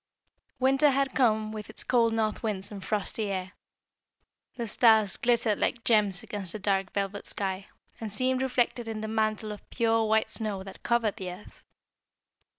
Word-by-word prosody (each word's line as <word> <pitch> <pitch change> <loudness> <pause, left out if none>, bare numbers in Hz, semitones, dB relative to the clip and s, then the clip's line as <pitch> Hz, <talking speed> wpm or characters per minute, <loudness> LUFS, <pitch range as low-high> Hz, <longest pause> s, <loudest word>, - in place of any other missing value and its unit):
Winter 270 +3 +4
had 275 -1 +1
come 220 -4 +2
with 215 -1 -7
its 220 - -3
cold 235 -2 +3
north 220 -1 -1
winds 200 -3 -3
and 200 -2 -7
frosty 210 +2 0
air. 185 -1 -3 1.0
The 240 -2 -3
stars 220 -2 +4
glittered 235 -3 +1
like 235 - 0
gems 205 -5 +3
against 195 -4 -4
the - - -3
dark 195 -2 0
velvet 200 0 -3
sky, 195 0 -3 0.3
and 220 -2 -5
seemed 255 +4 0
reflected 245 -2 0
in 220 -1 -4
the 220 - -3
mantle 215 0 -1
of 210 - -10
pure 225 -1 +2
white 220 0 +2
snow 210 -4 -2
that 195 0 -11
covered 235 -3 +1
the 185 -2 -5
earth. 185 +4 -13
215 Hz, 165 wpm, -28 LUFS, 200-235 Hz, 1.0 s, Winter